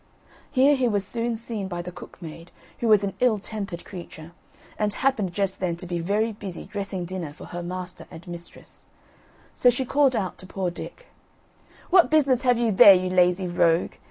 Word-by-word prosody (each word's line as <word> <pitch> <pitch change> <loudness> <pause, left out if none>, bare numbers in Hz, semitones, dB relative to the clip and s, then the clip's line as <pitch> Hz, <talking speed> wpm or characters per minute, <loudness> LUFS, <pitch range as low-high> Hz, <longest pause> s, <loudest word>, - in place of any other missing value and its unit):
Here 280 +2 +4
he 260 -2 +1
was 205 -3 0
soon 230 +2 -2
seen 220 -3 -5
by 175 -2 -5
the 180 - -7
cook - - -12
maid, 165 +1 -10 0.3
who 235 - -1
was 210 -2 +5
an 195 -1 -2
ill 245 -4 +3
tempered 200 -3 -6
creature, 170 -3 -10 0.5
and 210 -1 +1
happened 215 -6 0
just 195 +1 -1
then 180 -2 -1
to 175 - -9
be 175 -1 -3
very 205 +6 0
busy 200 -4 -8
dressing 195 -3 -4
dinner 175 -4 -5
for - - -11
her 175 - -6
master 180 +1 -6
and 160 - -12
mistress; 170 0 -10 0.7
so 250 - +4
she 245 +2 0
called 275 0 +3
out 190 -5 -3
to 185 - -11
poor 190 -2 -2
Dick: - - -9 0.9
"What 360 -2 +6
business 275 -5 +3
have 250 -2 +3
you 235 -2 +1
there, 195 0 +9
you 185 0 -1
lazy 180 0 +3
rogue? 170 -1 +2
195 Hz, 190 wpm, -25 LUFS, 175-230 Hz, 0.9 s, there